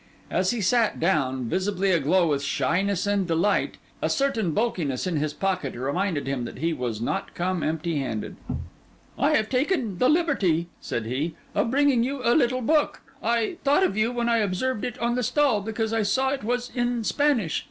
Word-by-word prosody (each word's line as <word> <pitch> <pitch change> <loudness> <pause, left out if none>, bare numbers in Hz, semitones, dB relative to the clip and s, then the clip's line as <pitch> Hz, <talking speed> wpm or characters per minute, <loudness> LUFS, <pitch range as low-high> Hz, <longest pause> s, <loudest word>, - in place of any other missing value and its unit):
As 185 +1 +1
he 240 -3 -1
sat 225 +3 +2
down, 135 -8 +1
visibly 190 - 0
aglow 170 +2 +3
with 140 -2 +1
shyness 180 +8 0
and 200 -2 +1
delight, 170 +5 +1 0.2
a - - +1
certain 250 -9 +1
bulkiness 170 - -1
in 180 -4 -1
his 150 0 -1
pocket 185 -4 -2
reminded 145 +6 -1
him 135 -2 -2
that - - -8
he 165 +4 0
was 125 -6 -3
not 115 - -3
come 180 0 -1
empty 160 0 -1
handed. 110 -6 -4 0.8
'I - - +3
have 215 - +2
taken 255 - 0
the 255 - +4
liberty,' 205 - +2
said 115 - -3
he, 140 +8 -2 0.2
'of - - +1
bringing 275 -1 +3
you 270 +3 -1
a 240 - +4
little 255 -3 +2
book. 300 +5 +1 0.2
I 235 +8 0
thought 290 +7 +4
of 195 - +1
you, 215 +3 +1
when 240 -1 -1
I 235 -1 +3
observed 210 +4 -1
it 245 - -4
on 235 +1 0
the 250 - 0
stall, 255 -3 +2
because 220 +1 -2
I 225 - +2
saw 260 +6 +1
it 275 -6 -3
was 245 +2 -2
in 240 -2 0
Spanish. 250 - +1
200 Hz, 190 wpm, -25 LUFS, 165-245 Hz, 0.8 s, the